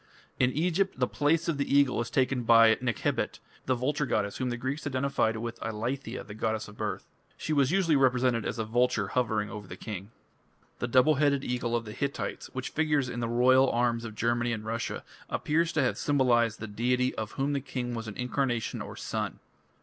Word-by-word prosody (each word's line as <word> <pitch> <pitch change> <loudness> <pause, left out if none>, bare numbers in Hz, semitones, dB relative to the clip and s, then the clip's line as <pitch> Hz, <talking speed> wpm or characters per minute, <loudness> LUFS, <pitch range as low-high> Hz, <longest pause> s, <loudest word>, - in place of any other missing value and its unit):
In 125 0 +4
Egypt 180 +2 0
the 125 - +4
place 150 +5 +1
of 160 -4 -1
the 140 0 +1
eagle 130 -4 +3
is 115 - -4
taken 130 -1 +1
by 115 -1 +7
Nekhebit, 120 -4 -1 0.3
the 130 - +3
vulture 145 +3 -1
goddess 100 -3 -1
whom 130 -1 -1
the 120 - -2
Greeks 135 +5 -3
identified 130 -4 0
with 115 +1 -5
"Eileithyia, 115 +5 -4
the 105 - -9
goddess 110 0 -2
of 105 - -12
birth; - - -3 0.3
she 155 - -2
was 140 -3 +3
usually 175 -3 +3
represented 125 -3 +3
as 115 - -3
a 110 - -1
vulture 115 -3 +1
hovering 110 -2 0
over 105 -3 -7
the 90 - -8
king". 100 -2 -6 0.7
The 120 - -1
double 130 +5 +5
headed 140 -2 +3
eagle 120 -2 -1
of 115 -1 -1
the 105 - -7
Hittites, 140 +3 -3
which 130 -1 -4
figures 150 -4 +1
in 120 - -4
the 120 - -1
royal 130 +3 +5
arms 120 -1 +1
of 110 -2 -7
Germany 120 +2 +1
and 110 -1 -5
Russia, 115 +1 -3 0.3
appears 165 +2 +1
to 155 - +2
have 130 - 0
symbolized 120 -5 +2
the 110 - -5
deity 125 +4 0
of 110 -1 -5
whom 140 +2 -1
the 140 - -1
king 125 -2 -4
was 115 -1 -4
an 105 - -7
incarnation 125 -2 -1
or - - -7
son. - - -3
125 Hz, 205 wpm, -29 LUFS, 115-140 Hz, 0.7 s, by